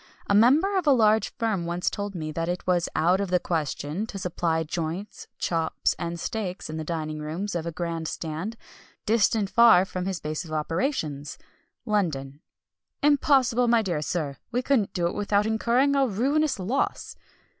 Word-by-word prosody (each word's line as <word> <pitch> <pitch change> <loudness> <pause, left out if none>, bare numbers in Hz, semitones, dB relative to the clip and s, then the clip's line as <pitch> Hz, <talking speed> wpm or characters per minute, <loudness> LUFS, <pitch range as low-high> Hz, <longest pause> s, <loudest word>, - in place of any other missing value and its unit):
A - - 0
member 295 - +5
of 340 - -5
a - - +7
large 220 -3 +3
firm 210 -7 -1
once 175 +1 -3
told 200 -1 -2
me 155 -2 -4
that 165 +2 -2
it 180 +1 -3
was 180 -2 +1
"out 180 +4 +3
of 200 - -2
the 180 0 +3
question" 160 +3 -2
to 200 - -7
supply 170 -3 -1
joints, 170 +5 -5
chops, 165 -2 0
and 170 0 -4
steaks 190 -4 -4
in 155 - -5
the 160 - -3
dining 155 -1 -4
rooms 165 +7 -4
of 170 -1 -3
a - - -2
grand 165 -1 -3
stand, 165 +10 -4 0.5
distant 215 -1 +2
far 230 -6 +7
from 185 -1 -4
his 190 -3 -2
base 155 +3 -4
of 160 - -11
operations, 155 - -2 0.5
London. 150 - -1 0.6
"Impossible, 270 -4 +3
my 235 -1 +4
dear 170 -7 -1
sir! 150 -3 -3
we 250 +1 0
couldn't 245 -8 +2
do 175 -2 0
it 170 - 0
without 205 0 +1
incurring 240 +5 +2
a 275 -1 +3
ruinous 275 +8 +1
loss." 205 +9 -2
185 Hz, 175 wpm, -26 LUFS, 165-225 Hz, 0.6 s, a